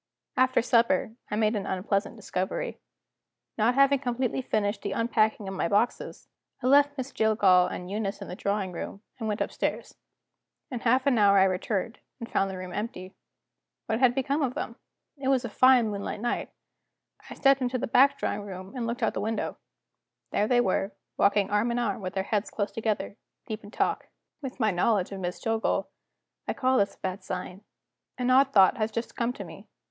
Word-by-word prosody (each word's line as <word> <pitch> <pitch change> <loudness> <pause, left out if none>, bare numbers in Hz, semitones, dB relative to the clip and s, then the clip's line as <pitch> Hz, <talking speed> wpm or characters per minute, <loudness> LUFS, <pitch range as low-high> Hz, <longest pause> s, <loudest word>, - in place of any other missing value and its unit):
After 255 -2 +3
supper, 230 -3 +2 0.2
I - - -2
made 215 +1 +2
an 200 - -3
unpleasant 195 +3 -1
discovery. 215 - -3 0.8
Not 230 +3 +2
having 275 0 +5
completely 255 0 -1
finished 205 -4 -1
the 200 - -3
unpacking 220 -2 +1
of 190 - -4
my 185 - -1
boxes, 210 +6 -1 0.4
I - - -2
left 285 +2 +5
Miss 265 +1 -4
Jillgall 200 -5 +4
and 180 - -6
Eunice 205 -1 -2
in - - -7
the 180 - -6
drawing 200 -1 -1
room, 195 +4 -7 0.2
and 220 - -3
went 210 0 -2
upstairs. - - -2 0.8
In 245 - -3
half 255 +3 +2
an 260 -5 +3
hour 200 -1 +6
I 190 - +7
returned, 195 +4 -1 0.2
and 230 - -6
found 195 -3 0
the 190 - -6
room 185 -1 -7
empty. 190 -4 -5 0.7
What 220 0 -1
had 250 -2 +4
become 275 +3 0
of 255 -3 -1
them? 230 - -4 0.4
It 270 -1 -4
was 265 -2 +2
a - - -4
fine 255 -1 +5
moonlight 200 +1 -4
night; 240 +2 -2 0.8
I - - -8
stepped 275 -1 +4
into 255 0 0
the - - -2
back 270 +4 +4
drawing - - -2
room, 190 -1 -8
and 240 -2 -2
looked 235 +1 -3
out 225 - +4
of - - -10
the - - -3
window. 220 +1 -3 0.7
There 210 - +1
they 245 +1 +4
were, 195 -1 0 0.2
walking 200 0 +2
arm 210 +3 +2
in 235 - -1
arm 220 -4 -1
with 185 0 -5
their 190 - 0
heads 205 +1 -1
close 205 -1 -2
together, 215 -2 -2 0.3
deep 220 0 -6
in 205 - -10
talk. - - -1 0.3
With 265 -2 -7
my 220 -3 +3
knowledge 190 +1 +1
of 195 - -5
Miss 180 -1 -4
Jillgall, 225 0 0 0.6
I - - 0
call 260 0 +2
this 200 0 +1
a - - -38
bad 190 +1 -4
sign. 185 +2 -6 0.5
An 250 0 +1
odd 270 +1 +5
thought 195 -5 +6
has 220 -1 -1
just 230 +2 -4
come 235 0 0
to - - -7
me. - - -12
220 Hz, 200 wpm, -27 LUFS, 200-245 Hz, 0.8 s, I